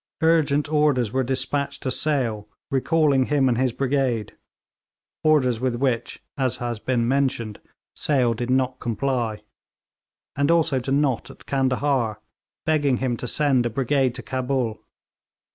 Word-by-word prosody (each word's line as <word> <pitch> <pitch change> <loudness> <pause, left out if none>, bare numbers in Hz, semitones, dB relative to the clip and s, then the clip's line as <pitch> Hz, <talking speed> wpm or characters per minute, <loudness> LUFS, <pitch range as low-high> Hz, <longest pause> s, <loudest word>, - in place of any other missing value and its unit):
Urgent 155 -3 +3
orders 145 -7 +2
were 130 - +1
despatched 135 +2 -2
to 130 - -1
Sale, 125 -8 0 0.2
recalling 140 -1 +2
him 145 -3 +2
and 125 - +2
his 130 -1 +2
brigade 130 -4 -1 0.9
orders 130 -7 +3
with 130 -2 0
which, 125 -2 -2 0.2
as 130 -1 +1
has 120 -2 -4
been 120 0 0
mentioned, 130 -5 0 0.4
Sale 130 -5 +2
did 120 +2 -4
not 130 0 +1
comply 115 -3 -2 0.9
and 140 0 +1
also 165 -5 +3
to 130 +2 -4
Nott, 140 -3 +1
at - - -14
Candahar, 130 -4 0 0.5
begging 145 -5 +2
him 125 -1 -1
to 125 - -5
send 135 -3 +2
a - - -3
brigade 130 +1 +1
to 125 - -6
Cabul. 130 -4 -2
130 Hz, 140 wpm, -23 LUFS, 120-140 Hz, 0.9 s, Urgent